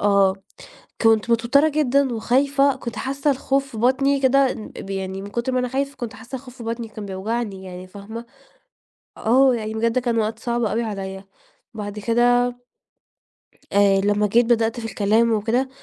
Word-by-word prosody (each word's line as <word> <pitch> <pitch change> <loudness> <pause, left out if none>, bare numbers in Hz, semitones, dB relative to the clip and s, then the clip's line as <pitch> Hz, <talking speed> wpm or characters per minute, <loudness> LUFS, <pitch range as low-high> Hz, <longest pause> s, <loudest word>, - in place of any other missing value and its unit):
آه 200 -2 +4 0.7
كنت 225 +1 +3
متوترة 245 +7 +4
جدًا 280 -4 +1
وخايفة، 275 +4 +2
كنت 235 -3 -7
حاسة 275 +2 -1
الخوف 275 0 0
في 225 - -9
بطني 270 +3 +2
كده 270 0 +4
ن 215 - -8
ب 195 - -9
يعني 190 0 -4
من 200 - -8
كُتر 240 +3 -2
ما 255 - +1
أنا 250 0 0
خايفة 275 +2 -2
كنت 240 -3 -6
حاسة 260 +2 -8
الخوف 255 0 -12
في 235 - -10
بطني 230 0 -4
كان 215 -2 -8
بيوجعني، 195 0 -4
يعني 180 0 -8
فاهمة؟ 215 +5 -9 0.9
آه 255 +3 +4
يعني 220 -1 -4
بجد 230 +2 +1
كان 240 -2 -1
وقت 220 +1 -1
صعب 240 0 -1
أوي 225 +2 0
عليَّ. 195 -2 -5 0.5
بعد 210 -1 -6
كده 245 +2 +3 1.2
آآ، 200 -1 +4
لمّا 205 +1 +2
جيت 235 +3 +3
بدأت 230 0 +1
في 225 - -6
الكلام 220 +2 +2
وكده، 230 +5 0
230 Hz, 170 wpm, -22 LUFS, 210-255 Hz, 1.2 s, آه